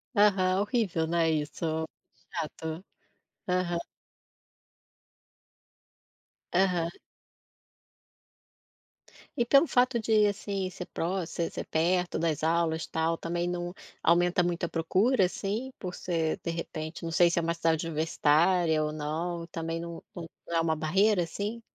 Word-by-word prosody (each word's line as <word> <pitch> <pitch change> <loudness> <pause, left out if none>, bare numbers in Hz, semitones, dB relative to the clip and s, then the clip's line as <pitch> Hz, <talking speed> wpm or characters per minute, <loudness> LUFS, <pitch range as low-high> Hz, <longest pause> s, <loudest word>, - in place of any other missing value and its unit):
Aham, 195 -2 +4
horrível, 205 -8 0
né, 165 0 +2
isso? 160 +1 -1 0.5
Chato. 160 +2 -5 0.6
Aham. 180 -1 +1 2.8
Aham. 180 -2 +2 2.5
E 240 - +3
pelo 275 +6 +5
fato 250 -1 +3
de, 215 -1 +3
assim, 200 -2 -1
ser 180 -1 -7
proximo 175 +1 -2
ser 170 0 -3
ser - - -5
perto 180 +2 +1
das 160 -2 -1
aulas 165 0 +1
tal, 160 +1 0
também 175 +1 -2
não 175 0 -3 0.3
aumenta 175 +2 +4
muito 175 0 -1
a 170 - +2
procura, 190 +7 +2
assim? 210 +8 -3
Por 180 -2 -5
ser, 165 -3 -1
de - - -2
repente, 165 0 -5
não 165 - -3
sei, 170 +1 +5
se 170 - -2
é 170 - +4
uma 170 0 +1
cidade 165 -1 +1
universitária 160 +1 +2
ou 150 - -1
não, 165 +3 -3
também, 165 0 -4
não 170 0 -6
não 170 0 -7
é - - +4
uma 160 -1 +1
barreira, 190 +6 +3
assim? 205 +7 -4
170 Hz, 130 wpm, -29 LUFS, 165-185 Hz, 2.8 s, pelo